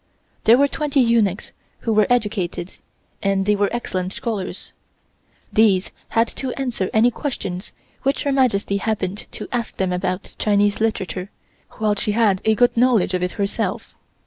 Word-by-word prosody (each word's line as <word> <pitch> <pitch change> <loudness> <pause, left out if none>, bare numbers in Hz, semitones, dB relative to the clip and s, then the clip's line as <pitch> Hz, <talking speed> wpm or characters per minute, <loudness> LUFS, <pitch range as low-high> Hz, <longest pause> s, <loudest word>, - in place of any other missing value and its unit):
There 230 +2 +7
were 280 +1 +4
twenty 290 -1 -1
eunuchs 230 -6 +2 0.3
who 225 - 0
were 215 -1 +4
educated 210 -7 -1 0.4
and 195 -2 +1
they 210 0 +3
were 205 0 +1
excellent 185 -6 -3
scholars. 210 -6 -4 0.8
These 200 -4 +3 0.2
had 230 +1 +2
to 260 -2 -2
answer 245 -8 -2
any 230 +3 +4
questions 195 -10 -4 0.3
which 275 +1 0
Her 285 - 0
Majesty 230 -7 +2
happened 200 -2 -2
to - - -6
ask 240 -2 -3
them 185 -1 0
about 180 +1 -3
Chinese 205 -1 +2
literature, 195 -4 -1 0.4
while 215 -1 +1
she 205 0 -1
had 210 -4 +3
a 220 0 +4
good 245 +2 +3
knowledge 235 -6 +3
of 180 - 0
it 180 0 -1
herself. 200 -1 -2
210 Hz, 155 wpm, -21 LUFS, 195-235 Hz, 0.8 s, There